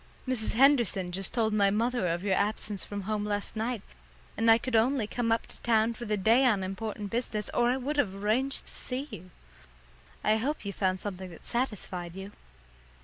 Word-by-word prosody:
Mrs. 250 -4 0
Henderson 235 -9 +4
just 190 +1 -1
told 220 -3 +1
my 200 -2 +4
mother 230 0 0
of 170 +2 -1
your 200 -2 +1
absence 205 0 +1
from 205 0 -5
home 210 +1 -2
last 205 0 -3
night, 220 -1 -2 0.5
and 225 0 +2
I 225 - +8
could 255 0 -3
only 235 +1 +3
come 230 +2 -1
up 225 - +1
to - - -11
town 225 -1 +2
for 235 +1 -7
the 210 -1 0
day 225 +7 +4
on 215 -7 +3
important 200 +1 -5
business 230 -3 -2
or 240 - +3
I 255 - +2
would 285 +3 -3
have 200 -9 +1
arranged 225 +7 +1
to - - -11
see 265 +3 -4
you. 185 -3 -9 0.9
I 215 +1 +3
hope 270 +3 -2
you 200 - -3
found 185 -1 0
something 185 -2 -5
that 165 - -13
satisfied 190 -8 -2
you." 195 +1 -7
215 Hz, 200 wpm, -29 LUFS, 195-240 Hz, 0.9 s, I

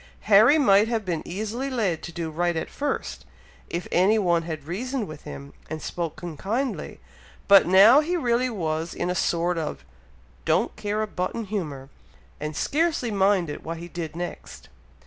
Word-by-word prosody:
Harry 220 +8 +6
might 210 -7 +5
have 225 -3 -1
been 170 -4 -2
easily 220 +8 -4
led 210 -11 -1
to 175 - -7
do 165 -1 -4
right 175 +2 0
at - - -4
first, 285 -1 -3 0.5
if 170 +1 -4
any 195 +5 +4
one 175 -5 +2
had 160 -3 -6
reasoned 230 - -3
with 155 -1 -10
him 140 +1 -9 0.2
and 155 0 -4
spoken 170 0 -5
kindly, 240 - -3 0.5
but 200 -3 +7
now 200 +9 +8
he 340 +4 0
really 250 -3 +1
was 165 -6 -3
in 180 - -1
a - - 0
sort 170 -1 0
of 150 - -5 0.6
don't - - +1
care 210 +1 -2
a - - -3
button 200 +3 -3
humour, 155 -10 -4 0.5
and 150 0 -4
scarcely 300 - 0
minded 190 -6 +1
what 165 +1 -5
he 170 +1 -8
did 165 -2 -6
next. 175 +1 -7
185 Hz, 165 wpm, -25 LUFS, 165-225 Hz, 0.6 s, now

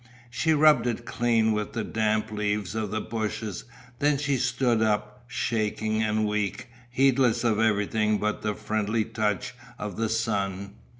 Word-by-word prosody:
She 160 +7 +1
rubbed 150 -3 +5
it 120 0 -2
clean 115 -2 +2
with 105 -1 -2
the - - -2
damp 110 -1 0
leaves 105 -2 -1
of 110 -2 -2
the 110 +1 -2
bushes, 110 -2 -4 0.3
then 145 0 +3
she 140 -1 0
stood 120 -2 +1
up, 105 +2 -1
shaking 110 -2 -1
and 110 0 +1
weak, 105 +1 -2 0.2
heedless 125 -2 +3
of 110 -3 +2
everything 105 0 +2
but 105 +1 -2
the 105 -1 -1
friendly 110 +1 -1
touch 110 0 -2 0.2
of 105 -3 -5
the 115 0 0
sun. 100 -3 -1
110 Hz, 155 wpm, -26 LUFS, 105-115 Hz, 0.3 s, rubbed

